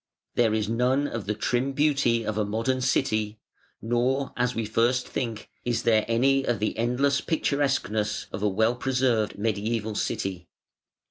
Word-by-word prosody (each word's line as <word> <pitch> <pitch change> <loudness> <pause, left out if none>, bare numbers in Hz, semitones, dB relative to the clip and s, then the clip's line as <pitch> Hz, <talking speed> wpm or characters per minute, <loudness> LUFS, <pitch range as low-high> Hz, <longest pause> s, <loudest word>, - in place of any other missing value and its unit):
There 115 -3 +2
is 105 -1 0
none 125 +5 +1
of 115 -6 -5
the 105 - 0
trim 125 +5 0
beauty 135 -6 +2
of 110 - -2
a 105 - +1
modern 115 +5 -1
city, 110 -5 0 0.5
nor, 125 +4 0
as 125 0 0
we 115 - -1
at 105 - -6
first 120 +3 +2
think, 115 -4 -4 0.2
is 120 -1 -1
there 110 -2 +3
any 135 +4 +3
of 120 -3 0
the 105 +2 -1
endless 130 +4 +1
picturesqueness 140 - 0
of 95 - -5
a 105 - +2
well 110 +4 +2
preserved 125 -4 0
mediæval 110 +1 -1
city. 95 -3 -3
115 Hz, 160 wpm, -26 LUFS, 110-130 Hz, 0.5 s, there